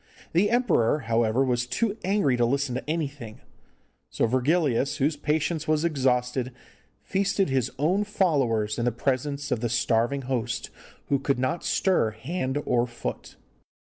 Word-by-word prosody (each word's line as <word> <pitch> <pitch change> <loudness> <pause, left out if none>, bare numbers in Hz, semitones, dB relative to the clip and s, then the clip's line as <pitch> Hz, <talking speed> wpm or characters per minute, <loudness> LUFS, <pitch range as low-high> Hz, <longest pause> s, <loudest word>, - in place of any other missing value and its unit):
The 190 +5 +3
emperor, 210 - +2
however, 115 +1 +1
was 120 -1 0
too 215 - 0
angry 190 -9 +2
to 120 - +1
listen 135 +2 0
to 130 +4 -5
anything, 140 -8 -4 0.7
so - - 0
Virgilius, 140 +2 +1
whose 145 +2 +1
patience 150 +2 -1
was 155 +1 +2
exhausted, 130 -4 0 0.5
feasted 195 -2 0
his 130 -2 +1
own 175 +9 +2
followers 135 - +1
in 120 - 0
the 120 - +2
presence 140 +3 -2
of 125 - +1
the 120 +1 -1
starving 120 +4 +1
host, 120 -2 -3 0.4
who 140 - +2
could 140 0 0
not 130 +7 -1
stir 180 - +2
hand 130 +5 -3
or 120 0 +2
foot. 120 -1 -6
135 Hz, 150 wpm, -26 LUFS, 120-155 Hz, 0.7 s, The